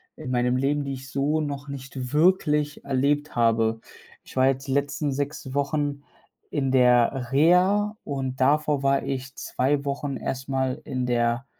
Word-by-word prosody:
in 150 Hz, -5 st, -8 dB
meinem 125 Hz, 0 st, +1 dB
Leben, 145 Hz, +2 st, 0 dB
die 140 Hz, -1 st, -4 dB
ich 135 Hz, 0 st, -8 dB
so 145 Hz, +3 st, 0 dB
noch 145 Hz, -1 st, -4 dB
nicht 135 Hz, -1 st, -7 dB
wirklich 150 Hz, -3 st, +2 dB
erlebt 145 Hz, +2 st, 0 dB
habe. 115 Hz, -1 st, +2 dB, 0.4 s
Ich -, -, -15 dB
war 130 Hz, 0 st, +4 dB
jetzt 135 Hz, +1 st, -1 dB
die 135 Hz, -, -1 dB
letzten 145 Hz, +1 st, 0 dB
6 140 Hz, -1 st, -4 dB
Wochen 145 Hz, 0 st, -1 dB, 0.5 s
in 135 Hz, -3 st, 0 dB
der 125 Hz, 0 st, +3 dB
Reha 185 Hz, +8 st, +3 dB
und 135 Hz, -2 st, -4 dB
davor 145 Hz, +1 st, +2 dB
war 135 Hz, 0 st, +3 dB
ich 130 Hz, 0 st, -4 dB
2 140 Hz, +2 st, -1 dB
Wochen 140 Hz, -1 st, -3 dB
erst 130 Hz, +1 st, -5 dB
mal 130 Hz, +1 st, -1 dB
in 130 Hz, -4 st, -2 dB
der 120 Hz, +1 st, +1 dB
135 Hz, 160 wpm, -25 LUFS, 130-145 Hz, 0.5 s, war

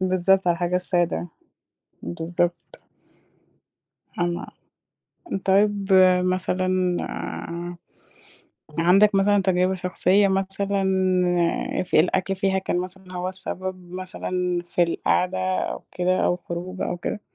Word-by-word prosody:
بالضبط 185 Hz, 0 st, +2 dB
على 175 Hz, -, +4 dB
الحاجة 175 Hz, +1 st, 0 dB
السادة. 175 Hz, -2 st, 0 dB, 0.8 s
بالضبط. 175 Hz, +1 st, -3 dB, 1.4 s
فاهمة، 175 Hz, 0 st, -1 dB, 1.0 s
طيب، 200 Hz, 0 st, +2 dB, 0.4 s
مثلًا 185 Hz, 0 st, 0 dB, 1.8 s
عندك 195 Hz, +5 st, +5 dB
مثلًا 200 Hz, +1 st, +3 dB
تجربة 185 Hz, 0 st, +2 dB
شخصية 185 Hz, +2 st, +2 dB
مثلًا 195 Hz, +1 st, -1 dB, 1.0 s
ف -, -, -6 dB
الأكل 185 Hz, +4 st, +3 dB
فيها 190 Hz, 0 st, +1 dB
كان 185 Hz, -1 st, -1 dB
مثلًا 185 Hz, 0 st, -9 dB
هو 180 Hz, +1 st, -2 dB
السبب 185 Hz, -1 st, -6 dB
مثلًا 180 Hz, -1 st, -3 dB
في 175 Hz, 0 st, 0 dB
القعدة، 180 Hz, +2 st, +1 dB, 0.2 s
أو -, -, -3 dB
كده، 180 Hz, +1 st, +1 dB
أو 175 Hz, -, +2 dB
خروجة 180 Hz, +2 st, -5 dB
أو 175 Hz, -, -3 dB
كده؟ 205 Hz, +4 st, -4 dB
185 Hz, 100 wpm, -24 LUFS, 180-190 Hz, 1.8 s, عندك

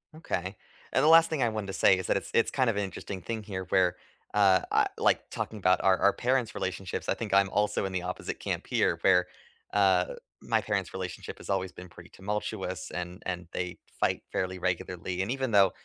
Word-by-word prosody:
Okay, 95 Hz, -, -3 dB, 0.4 s
and 130 Hz, -, +2 dB
the 150 Hz, -, +5 dB
last 165 Hz, 0 st, +8 dB
thing 155 Hz, -4 st, -1 dB
I 120 Hz, -, +3 dB
wanted 110 Hz, -2 st, -4 dB
to 95 Hz, -, -5 dB
say 95 Hz, -, +5 dB
is 95 Hz, -, -4 dB
that -, -, +2 dB
it's -, -, -6 dB
it's -, -, +3 dB
kind 130 Hz, -3 st, +2 dB
of 115 Hz, -, 0 dB
an 100 Hz, -, 0 dB
interesting 95 Hz, 0 st, -6 dB
thing 110 Hz, +3 st, -4 dB
here 95 Hz, -2 st, -5 dB
where, 90 Hz, -1 st, +3 dB, 0.4 s
uh, 95 Hz, -3 st, +5 dB
I -, -, +4 dB
like, -, -, +2 dB
talking 110 Hz, -, -4 dB
about 95 Hz, -1 st, +3 dB
our 95 Hz, -1 st, +5 dB
our 100 Hz, -, +4 dB
parents' 125 Hz, -2 st, 0 dB
relationships, 95 Hz, 0 st, -4 dB
I -, -, +2 dB
think -, -, -5 dB
I'm 100 Hz, 0 st, +5 dB
also 105 Hz, 0 st, +1 dB
in 95 Hz, -, -4 dB
the 90 Hz, -, -1 dB
opposite 90 Hz, +1 st, -5 dB
camp -, -, -3 dB
here -, -, +2 dB
where, 90 Hz, -2 st, +4 dB, 0.5 s
uh, 95 Hz, -3 st, +3 dB, 0.3 s
my -, -, +1 dB
parents' -, -, -2 dB
relationship -, -, -6 dB
has -, -, -12 dB
always 95 Hz, -2 st, 0 dB
been 90 Hz, +1 st, -11 dB
pretty 85 Hz, 0 st, -14 dB
tumultuous 95 Hz, -3 st, -4 dB
and 90 Hz, 0 st, -6 dB
and 90 Hz, -2 st, -4 dB
they 90 Hz, -1 st, -3 dB, 0.2 s
fight -, -, +2 dB
fairly 95 Hz, 0 st, -2 dB
regularly, 90 Hz, 0 st, -2 dB
and 100 Hz, -, -1 dB
even 130 Hz, -2 st, -1 dB
though 100 Hz, -3 st, +6 dB
95 Hz, 215 wpm, -29 LUFS, 90-105 Hz, 0.5 s, last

